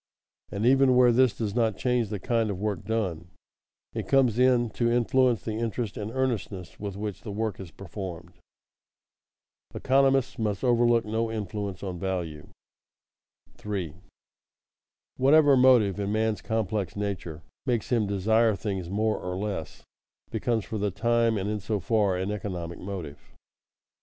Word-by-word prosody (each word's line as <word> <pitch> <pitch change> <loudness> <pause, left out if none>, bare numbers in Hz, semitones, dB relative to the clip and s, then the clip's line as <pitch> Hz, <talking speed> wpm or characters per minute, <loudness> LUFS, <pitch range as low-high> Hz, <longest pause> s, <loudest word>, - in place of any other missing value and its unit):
And 100 +3 -2
even 135 0 +5
where 125 -1 +6
this 125 -3 +3
does 105 -3 -2
not 115 -2 +1
change 125 -4 0
the 105 - -3
kind 115 +1 0
of 100 - -3
work 100 -3 -2
done, 95 -7 -2 0.7
it - - -4
comes 130 -4 +3
in 125 -3 +3
to 120 +3 0
influence 120 0 +2
the 110 - -3
interest 115 -2 -3
and 105 +1 -4
earnestness 110 -8 -3
with 100 -2 -5
which 105 -1 -5
the 110 - -8
work 110 0 -3
is 95 -3 -8
performed. 90 -1 -8 1.4
[Sidenote: - - -24
Economists 135 -1 +3
must 105 -3 -1
overlook 120 -2 +3
no 110 +1 -1
influence 105 -3 -4
on 90 -3 -4
value] 85 -5 -4 1.1
3. 95 -7 -4 1.3
_Whatever 145 +1 +6
motive 125 -7 +5
in 100 0 -1
man's 110 0 0
complex 110 -5 -2
nature 95 -6 -4 0.2
makes 120 -2 -1
him 115 -4 +2
desire 110 +3 +2
things 95 -1 -4
more 110 +3 0
or 90 0 -4
less, 95 -5 -5 0.5
becomes 115 -4 -1
for 110 - -4
the 105 0 0
time, 115 +3 +1
and 100 0 -2
in 105 0 -2
so 105 +2 -2
far, 100 +2 +1
an 95 +3 -2
economic 90 -5 -5
motive. 90 -7 -6
105 Hz, 150 wpm, -27 LUFS, 95-120 Hz, 1.4 s, where